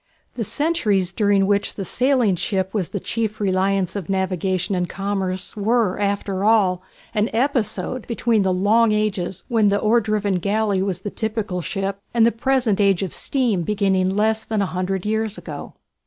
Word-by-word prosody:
The 235 Hz, -, -3 dB
centuries 210 Hz, -, 0 dB
during 200 Hz, -2 st, +3 dB
which 200 Hz, 0 st, 0 dB
the 195 Hz, -, -4 dB
sailing 250 Hz, -2 st, +2 dB
ship 190 Hz, +1 st, -2 dB
was 195 Hz, -6 st, -1 dB
the 200 Hz, -, -3 dB
chief 220 Hz, +2 st, -3 dB
reliance 195 Hz, -1 st, +1 dB
of 195 Hz, -4 st, -5 dB
navigation 190 Hz, -1 st, -1 dB
and 180 Hz, -1 st, -1 dB
commerce 195 Hz, -2 st, -3 dB
were, 215 Hz, -2 st, +1 dB
after 200 Hz, -1 st, -1 dB
all, 200 Hz, -5 st, +3 dB, 0.3 s
an 215 Hz, 0 st, +1 dB
episode 245 Hz, -1 st, -1 dB
between 230 Hz, -2 st, +1 dB
the 190 Hz, -1 st, +1 dB
long 215 Hz, +5 st, +3 dB
ages 200 Hz, -4 st, -1 dB
when 225 Hz, -4 st, +3 dB
the 200 Hz, -, +2 dB
oar 225 Hz, +3 st, +3 dB
driven 205 Hz, -3 st, 0 dB
galley 200 Hz, +1 st, 0 dB
was 190 Hz, -2 st, -2 dB
the 205 Hz, -, -5 dB
typical 215 Hz, -4 st, -3 dB
ship, 195 Hz, +2 st, -3 dB, 0.2 s
and 230 Hz, -1 st, +5 dB
the 235 Hz, -, +4 dB
present 235 Hz, -3 st, +1 dB
age 195 Hz, -2 st, +3 dB
of 185 Hz, -, -4 dB
steam 240 Hz, -9 st, 0 dB
beginning 190 Hz, 0 st, +1 dB
less 220 Hz, +1 st, +1 dB
than 220 Hz, -1 st, -2 dB
a 190 Hz, -, -4 dB
hundred 185 Hz, +1 st, -2 dB
years 220 Hz, 0 st, -1 dB
ago. -, -, -8 dB
205 Hz, 170 wpm, -21 LUFS, 190-220 Hz, 0.3 s, and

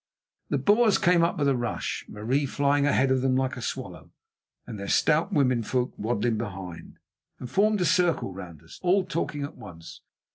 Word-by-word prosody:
The -, -, +1 dB
Boers 215 Hz, 0 st, +4 dB
came 175 Hz, -1 st, +3 dB
up 170 Hz, -, 0 dB
with 145 Hz, -, +1 dB
a 135 Hz, -, +3 dB
rush, 120 Hz, -1 st, -3 dB
Marie 130 Hz, +7 st, -1 dB
flying 140 Hz, +1 st, +1 dB
ahead 135 Hz, -2 st, +2 dB
of 130 Hz, -1 st, +2 dB
them 130 Hz, 0 st, +1 dB
like 130 Hz, 0 st, 0 dB
a 125 Hz, -, -7 dB
swallow, -, -, -6 dB, 0.6 s
and 110 Hz, -4 st, -8 dB
their 100 Hz, -, -5 dB
stout 160 Hz, -, +2 dB
womenfolk 125 Hz, -, +1 dB
waddling 115 Hz, 0 st, -1 dB
behind, 95 Hz, -6 st, -7 dB, 0.4 s
and 125 Hz, -, -7 dB
formed 205 Hz, -, +2 dB
a -, -, +2 dB
circle 170 Hz, -, +1 dB
round 90 Hz, -5 st, -10 dB
us, -, -, -14 dB
all 185 Hz, +2 st, +3 dB
talking 165 Hz, -4 st, -3 dB
at 140 Hz, -, -7 dB
once. 85 Hz, -6 st, -11 dB
135 Hz, 180 wpm, -26 LUFS, 115-170 Hz, 0.6 s, Boers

